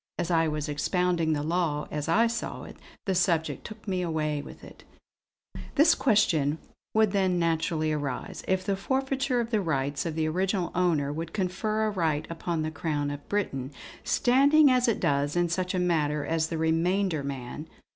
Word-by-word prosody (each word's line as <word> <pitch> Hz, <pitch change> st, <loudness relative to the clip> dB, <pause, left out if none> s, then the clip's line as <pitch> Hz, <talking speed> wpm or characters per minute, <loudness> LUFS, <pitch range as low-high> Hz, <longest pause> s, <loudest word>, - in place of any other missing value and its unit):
As 175 Hz, 0 st, -2 dB
I 165 Hz, -1 st, +3 dB
was 150 Hz, 0 st, -2 dB
expounding 165 Hz, +2 st, 0 dB
the 145 Hz, -1 st, -1 dB
law, 160 Hz, -2 st, -1 dB
as 150 Hz, +1 st, -3 dB
I 225 Hz, +7 st, +4 dB
saw 235 Hz, 0 st, -3 dB
it, -, -, -10 dB, 0.3 s
the 195 Hz, -, +1 dB
subject 175 Hz, -3 st, +1 dB
took 215 Hz, 0 st, -10 dB
me 185 Hz, -2 st, 0 dB
away 155 Hz, -3 st, -1 dB
with -, -, -12 dB
it: -, -, -13 dB, 0.9 s
"This 315 Hz, +3 st, +6 dB
question 160 Hz, -, +2 dB, 0.4 s
would 220 Hz, -2 st, +4 dB
then 190 Hz, -3 st, +1 dB
naturally 160 Hz, -2 st, 0 dB
arise: 145 Hz, -4 st, -4 dB
if 185 Hz, 0 st, 0 dB
the 200 Hz, -1 st, +1 dB
forfeiture 265 Hz, +4 st, 0 dB
of 235 Hz, 0 st, -2 dB
the 215 Hz, -3 st, +2 dB
rights 145 Hz, -2 st, -1 dB
of 160 Hz, -, -4 dB
the 160 Hz, -1 st, 0 dB
original 185 Hz, +2 st, 0 dB
owner 160 Hz, -6 st, +1 dB
would 165 Hz, +2 st, -5 dB
confer 215 Hz, +3 st, -1 dB
a 215 Hz, -, 0 dB
right 160 Hz, -6 st, 0 dB
upon 165 Hz, -1 st, -2 dB
the 155 Hz, -, -2 dB
Crown 145 Hz, -2 st, -2 dB
of 145 Hz, 0 st, -8 dB
Britain, 140 Hz, -10 st, -2 dB, 0.3 s
standing 280 Hz, +4 st, +4 dB
as 250 Hz, -1 st, +3 dB
it 230 Hz, -, +1 dB
does 145 Hz, +1 st, +1 dB
in 175 Hz, 0 st, +2 dB
such 180 Hz, +2 st, -1 dB
a -, -, +1 dB
matter 150 Hz, -4 st, +1 dB
as 160 Hz, -1 st, 0 dB
the 165 Hz, -, -3 dB
'remainder 165 Hz, +1 st, +1 dB
man.' 135 Hz, +2 st, -6 dB
170 Hz, 180 wpm, -27 LUFS, 155-195 Hz, 0.9 s, This